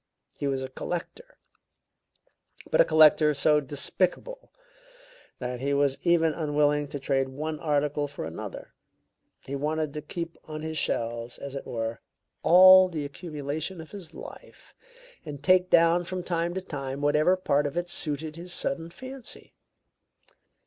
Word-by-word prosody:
He 140 - -3
was 135 -1 -1
a 130 - -5
collector, 180 - -6 1.3
but - - +5
a - - +5
collector 155 -1 +5
so 150 +2 +3
despicable 180 - -2 0.9
that 125 -1 -4
he 140 +2 0
was 140 -1 +1
even 165 -2 +3
unwilling 150 -2 +1
to 145 - -6
trade 135 -1 0
one 155 +3 -4
article 145 -1 0
for 140 - -7
another. 80 +1 -8 0.7
He 140 - -6
wanted 155 +1 -2
to 150 - -5
keep 170 +2 -6
on 155 0 -7
his 160 0 -4
shelves, 115 +1 -2
as 140 -1 -8
it 140 - -6
were, 115 -1 -4 0.4
all 185 +1 +8
the 155 -4 -4
accumulation 150 +3 -5
of 160 - -10
his 185 -5 -9
life, - - -12 0.5
and 145 -3 -8
take 185 +3 +4
down 170 +1 +5
from 185 0 -4
time 170 0 -1
to 190 - -2
time 140 -5 -5
whatever 150 +5 +3
part 145 -5 +1
of 145 - -6
it 175 0 -1
suited 155 -2 -3
his 175 +2 -6
sudden 170 -2 -1
fancy. 260 +5 -11
150 Hz, 150 wpm, -27 LUFS, 140-170 Hz, 1.3 s, all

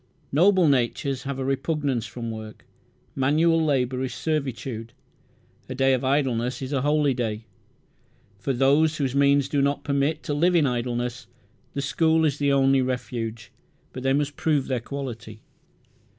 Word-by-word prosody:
Noble 180 +3 +4
natures 135 0 0
have 140 -1 -3
a 135 - -3
repugnance 135 -4 -1
from 115 +1 -6
work. 110 -1 -9 0.5
Manual 160 +5 +3
labour 130 -4 0
is 130 -2 -3
servitude. 130 -6 -3 0.8
A 130 - -4
day 135 0 +3
of 130 - 0
idleness 130 -3 0
is 130 +2 -4
a 135 - +1
holy 145 0 +2
day. 110 -3 -3 0.9
For 135 - -2
those 145 +5 +3
whose 135 -4 -1
means 140 0 +3
do 140 0 0
not 140 0 0
permit 145 +2 0
to 145 - -2
live 175 +5 +2
in 160 -4 +4
idleness 120 -2 -2 0.5
the 140 - -2
school 160 +2 +2
is 145 -2 0
the 140 -1 +2
only 135 -1 +4
refuge; 120 -4 -4 0.4
but 130 - -6
they 135 +1 +1
must 145 0 0
prove 155 -4 +1
their 130 -2 -1
quality. 120 -4 -7
135 Hz, 155 wpm, -25 LUFS, 125-145 Hz, 0.9 s, Noble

